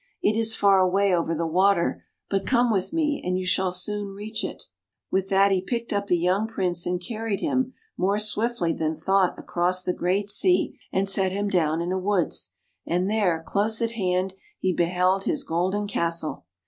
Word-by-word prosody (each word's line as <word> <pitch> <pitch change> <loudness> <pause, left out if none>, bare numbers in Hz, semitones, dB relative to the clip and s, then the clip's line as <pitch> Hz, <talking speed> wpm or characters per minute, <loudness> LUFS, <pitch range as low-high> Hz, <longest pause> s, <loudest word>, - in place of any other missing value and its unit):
It 215 - +3
is 225 0 +1
far 195 -1 +4
away 190 +1 +3
over 165 -1 -1
the 165 +1 -1
water. 180 +2 +2 0.2
But 195 -1 -1
come 245 -2 +3
with 195 -4 0
me, 305 -3 0
and 180 0 0
you 185 - -3
shall 185 0 +1
soon 200 +2 -2
reach 215 +2 -3
it." - - -5 0.5
With 190 0 0
that 195 0 +4
he 190 -1 +2
picked 235 +4 -3
up 200 0 -1
the 175 - +3
young 185 +5 +1
Prince 180 -6 -1
and 180 0 -1
carried 215 +2 -3
him, 260 -4 -1 0.2
more 195 +3 +1
swiftly 215 -4 +1
than 160 0 -2
thought, 190 +3 +1
across 180 +1 -1
the 180 - -1
great 190 +4 0
sea, 360 - +2 0.2
and 195 +1 0
set 195 -1 +1
him 200 +2 -1
down 165 -3 +1
in 175 - -3
a 190 - 0
woods. 190 -3 -1 0.3
And 180 +3 0
there, 180 -7 +1
close 215 +2 0
at 230 -1 0
hand, 185 -3 -1 0.2
he 185 -1 0
beheld 180 +3 +1
his - - 0
golden 185 +5 -1
castle! 170 - -2
190 Hz, 190 wpm, -25 LUFS, 180-210 Hz, 0.5 s, far